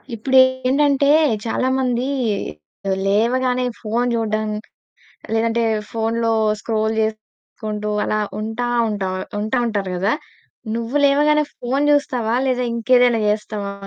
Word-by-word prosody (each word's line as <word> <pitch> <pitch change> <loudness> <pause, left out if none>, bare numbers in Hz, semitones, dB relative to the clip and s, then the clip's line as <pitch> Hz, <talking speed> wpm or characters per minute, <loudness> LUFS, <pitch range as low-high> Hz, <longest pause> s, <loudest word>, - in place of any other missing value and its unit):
ఇప్పుడేంటంటే 260 +3 +3 0.4
చాలా 245 +3 0
మంది 250 -2 0 1.0
లేవగానే 250 +5 +1
ఫోను 230 +3 -1
చూడడం, 215 -1 -1 0.9
లేదంటే 230 +1 +1 0.3
ఫోనులో 230 0 0 0.3
స్క్రోల్ 220 0 -1
జేసుకుంటూ 215 -1 -5
అలా 215 - 0 0.2
ఉంటా, 225 +3 -3 0.2
ఉంట్ 205 -2 -3 0.4
ఉంటా 220 +4 -1
ఉంటారు 200 -4 -2
కదా! 195 +5 +1 0.6
నువ్వు 235 +4 -3
లేవగానే 300 +2 +3
ఫోను 265 +4 -1
జూస్తావా 250 -6 0
లేదా 250 -1 0
ఇంకేదైనా 245 0 +3
జేస్తావా? 210 -1 -2
230 Hz, 100 wpm, -20 LUFS, 215-255 Hz, 1.0 s, ఇప్పుడేంటంటే